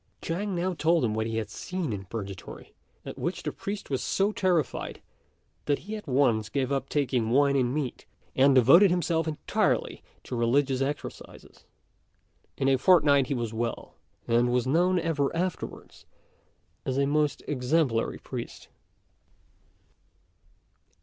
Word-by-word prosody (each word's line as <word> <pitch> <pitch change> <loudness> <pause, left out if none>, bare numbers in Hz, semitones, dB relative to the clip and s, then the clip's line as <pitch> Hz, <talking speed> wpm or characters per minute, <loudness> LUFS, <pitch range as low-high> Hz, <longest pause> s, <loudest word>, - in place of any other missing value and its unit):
Chang 190 +4 -3
now 180 +2 -1
told 165 -3 +2
him 110 - -1
what 110 +1 -1
he 115 0 -3
had 110 - -3
seen 180 -9 -4
in 95 -1 -6
Purgatory, 100 -3 -8 0.3
at - - -8
which - - -3
the - - -2
priest 200 -5 -6
was 135 - 0
so 195 +2 +1
terrified, 180 -9 -1 0.7
that 145 -1 +1
he 215 +2 -5
at 210 -5 -9
once 125 -6 +2
gave 135 +1 -1
up 135 -1 -1
taking 125 -6 0
wine 140 +3 +3
and 125 -3 +2
meat, 140 -3 -4 0.3
and 135 +1 +5
devoted 140 - +7
himself 170 -2 0
entirely 155 -1 -1 0.2
to - - -5
religious 130 +3 +1
exercises. 145 +2 -6 0.9
In 135 - 0
a 135 -1 +3
fortnight 145 -7 +5
he 140 - -1
was 115 -2 -3
well, 115 +1 -4 0.3
and 120 +1 +2
was 125 0 +1
known 175 +7 +2
ever 165 -4 0
afterwards 180 +1 -5 0.8
as 130 -1 -2
a 140 - +3
most 150 +1 0
exemplary 130 -3 0
priest. - - -8
140 Hz, 145 wpm, -27 LUFS, 125-165 Hz, 0.9 s, devoted